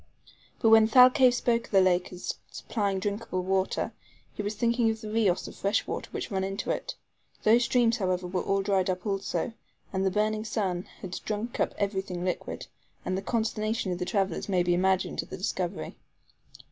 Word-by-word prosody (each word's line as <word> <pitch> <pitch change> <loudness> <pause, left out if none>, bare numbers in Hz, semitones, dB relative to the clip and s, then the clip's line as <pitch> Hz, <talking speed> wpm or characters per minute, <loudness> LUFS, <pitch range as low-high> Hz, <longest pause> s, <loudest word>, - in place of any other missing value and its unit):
But 225 - +4
when 220 0 +7
Thalcave 250 +1 +7
spoke 235 -1 +1
of - - -18
the 195 - +6
lake 185 -1 +2
as 180 -1 -4 0.2
supplying 200 -4 -2
drinkable 200 -1 -2
water 190 +1 0 0.4
he - - -4
was 205 +1 -3
thinking 235 +1 +2
of 220 0 -2
the 215 -1 -7
RIOS 215 -5 +1
of - - -10
fresh 200 +2 0
water - - -5
which - - -5
run 190 -1 0
into 195 +1 -2
it. - - -3 0.5
Those 235 +3 +5
streams, 240 -2 +3
however, 185 -2 -1
were 180 0 -1
all 195 0 0
dried 195 -2 +1
up 185 +1 -2
also; 200 +3 -2 0.4
the 190 0 +1
burning 215 +2 0
sun 190 -5 -2
had 185 -1 -5
drunk 215 +3 -3
up - - 0
every 200 -1 0
thing 180 -2 -5
liquid, 180 - -3 0.4
and 185 - -1
the 190 - -2
consternation 215 -1 -1
of 175 - -3
the 180 - -1
travelers 195 -3 -1
may 180 -2 +3
be 175 0 +2
imagined 190 +1 +1
at - - -13
the - - -6
discovery. - - -3
200 Hz, 190 wpm, -28 LUFS, 185-225 Hz, 0.5 s, when